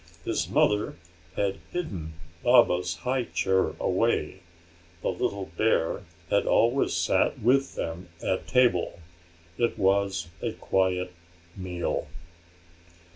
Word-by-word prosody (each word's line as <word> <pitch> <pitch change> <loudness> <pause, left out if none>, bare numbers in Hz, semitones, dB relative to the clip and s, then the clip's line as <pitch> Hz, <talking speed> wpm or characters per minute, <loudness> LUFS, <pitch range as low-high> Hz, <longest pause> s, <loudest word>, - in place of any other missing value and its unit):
His - - -1
mother 105 0 +2 0.4
had 100 -1 -1
hidden 95 - -4 0.3
Baba's 90 -8 +4
high 130 -1 +1
chair 95 -3 +1
away; - - 0 0.6
the - - +1
little 100 -1 -3
bear 105 -7 +1 0.3
had 100 - +2
always 120 +4 +3
sat - - +2
with 135 +4 +2
them 85 +2 -5
at 95 - -1
table. 125 -10 +2 0.6
It 120 - +1
was 95 -3 +1
a - - -2
quiet 90 -1 0 0.4
meal. 90 -2 -3
95 Hz, 105 wpm, -27 LUFS, 90-120 Hz, 0.6 s, Baba's